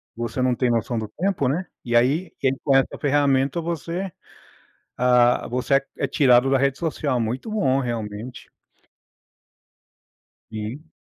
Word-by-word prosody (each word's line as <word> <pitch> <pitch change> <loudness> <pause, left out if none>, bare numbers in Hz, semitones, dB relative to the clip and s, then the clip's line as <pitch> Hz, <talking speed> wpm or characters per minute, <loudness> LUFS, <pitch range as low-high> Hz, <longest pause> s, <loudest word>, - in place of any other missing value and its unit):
Você 120 +2 -3
não 125 0 +2
tem 125 0 +1
noção 115 0 0
do 110 - -4
tempo, 185 -7 0
né, 165 +8 -1 0.2
e 120 -1 -1
aí 145 +9 +2
quem 135 -1 +2
tem 135 0 0
essa 135 - 0
ferramenta, 140 +1 +2
você 170 +3 -4 0.9
ah, 125 -1 +3
você 125 +3 0
é 135 - +1
é - - -1
tirado 130 -3 +4
da 135 - +4
rede 135 0 +1
social. 150 -6 -1
Muito 120 - -3
bom 135 -12 +1
realmente. 115 -1 -5 2.0
Sim. 110 +9 -7
130 Hz, 140 wpm, -23 LUFS, 120-145 Hz, 2.0 s, tirado